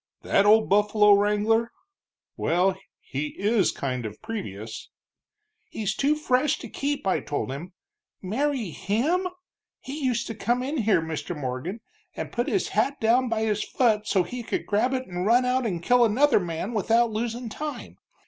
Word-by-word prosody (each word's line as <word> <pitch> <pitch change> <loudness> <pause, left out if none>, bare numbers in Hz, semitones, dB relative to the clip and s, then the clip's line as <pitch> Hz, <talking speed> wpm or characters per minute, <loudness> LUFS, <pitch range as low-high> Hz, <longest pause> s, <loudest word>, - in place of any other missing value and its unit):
"That 200 +1 +3
old 220 +1 +6
buffalo 210 +1 +5
wrangler? 210 +3 +2 0.6
Well, 185 +3 +1 0.3
he 150 +2 -5
is 205 -2 +2
kind 125 -3 -3
of 110 -1 -7
previous!" 110 - -6 0.8
"He's 210 -2 -2
too 285 +6 +2
fresh 275 -1 +1
to - - -9
keep, 285 -3 -3
I 190 - +2
told 145 -2 -3
him. 165 +7 -7 0.5
Marry 235 - -1
him! 295 - 0 0.5
He 290 +3 -7
used 240 -3 0
to - - -5
come 240 +4 0
in 285 +4 -2
here, 210 - +2
Mr. 160 +1 -4
Morgan, 145 - -4 0.3
and - - -5
put 240 +1 -1
his 385 - 0
hat 280 +1 0
down 245 +2 +3
by 225 -1 0
his 210 -1 0
foot 215 -4 +1
so 190 -4 +2
he 245 +8 -6
could 230 - -3
grab 245 +6 +1
it 260 0 -3
and 180 -1 -3
run 245 +3 +4
out 250 -1 +1
and 175 -5 -3
kill 245 +4 +4
another 250 +6 +4
man 175 +4 -4
without 230 +2 +2
losin' 235 +2 -3
time. 300 +6 -6
220 Hz, 165 wpm, -25 LUFS, 185-250 Hz, 0.8 s, old